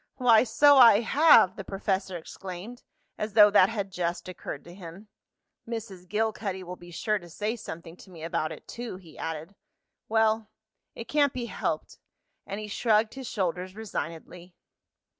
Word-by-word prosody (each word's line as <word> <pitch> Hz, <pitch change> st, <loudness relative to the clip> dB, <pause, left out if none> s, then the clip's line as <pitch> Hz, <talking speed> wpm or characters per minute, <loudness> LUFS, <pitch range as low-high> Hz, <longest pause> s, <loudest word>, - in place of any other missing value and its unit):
"Why, 240 Hz, -3 st, +5 dB
so 285 Hz, +5 st, +5 dB
I 230 Hz, -4 st, +8 dB
have!" 265 Hz, -, +5 dB
the 195 Hz, -, -5 dB
professor 195 Hz, -1 st, -2 dB
exclaimed, 190 Hz, +7 st, -9 dB, 0.4 s
as 215 Hz, -1 st, -3 dB
though 210 Hz, -1 st, +8 dB
that 185 Hz, -1 st, +6 dB
had 200 Hz, -4 st, -4 dB
just 175 Hz, -1 st, -3 dB
occurred 175 Hz, -5 st, -7 dB
to 175 Hz, -, -12 dB
him. 185 Hz, +3 st, -11 dB, 0.6 s
"Mrs. 205 Hz, -6 st, -7 dB
Gilcuddy 210 Hz, -3 st, -2 dB
will 180 Hz, 0 st, -7 dB
be 175 Hz, -1 st, -14 dB
sure 210 Hz, +5 st, -1 dB
to 175 Hz, -2 st, -14 dB
say 210 Hz, +7 st, -3 dB
something 165 Hz, -6 st, -9 dB
to 190 Hz, -, -15 dB
me 165 Hz, -3 st, -11 dB
about 160 Hz, -1 st, -2 dB
it -, -, -10 dB
too," 240 Hz, -4 st, -6 dB
he 175 Hz, -4 st, -16 dB
added. 160 Hz, +3 st, -6 dB, 0.6 s
"Well, 220 Hz, 0 st, +2 dB, 0.5 s
it 230 Hz, -, -8 dB
can't 285 Hz, -1 st, +2 dB
be 245 Hz, -2 st, -4 dB
helped," -, -, -4 dB, 0.5 s
and 200 Hz, +1 st, -5 dB
he 215 Hz, -, -6 dB
shrugged 215 Hz, +1 st, +1 dB
his 265 Hz, -2 st, -7 dB
shoulders 185 Hz, -2 st, -2 dB
resignedly. 180 Hz, -4 st, -7 dB
200 Hz, 160 wpm, -27 LUFS, 180-225 Hz, 0.6 s, I